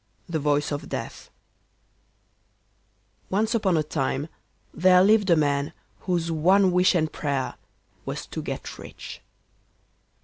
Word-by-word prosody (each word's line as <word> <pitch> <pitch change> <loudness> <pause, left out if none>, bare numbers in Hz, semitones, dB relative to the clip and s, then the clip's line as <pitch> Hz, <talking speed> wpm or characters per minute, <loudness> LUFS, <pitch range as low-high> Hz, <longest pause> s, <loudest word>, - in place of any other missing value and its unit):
THE 165 -2 -2
VOICE 145 0 +1
OF 145 - -4
DEATH - - -6 2.0
Once 215 +4 +1
upon 195 -7 +2
a 155 - +2
time 145 0 -2 0.4
there 180 +1 +5
lived 205 -1 +4
a 170 - +6
man 145 0 0 0.3
whose 170 -3 -1
one 185 +4 +4
wish 180 +1 +4
and 155 -2 0
prayer 140 -3 -2 0.5
was - - -5
to - - -6
get - - -6
rich. - - -10
170 Hz, 125 wpm, -25 LUFS, 145-185 Hz, 2.0 s, a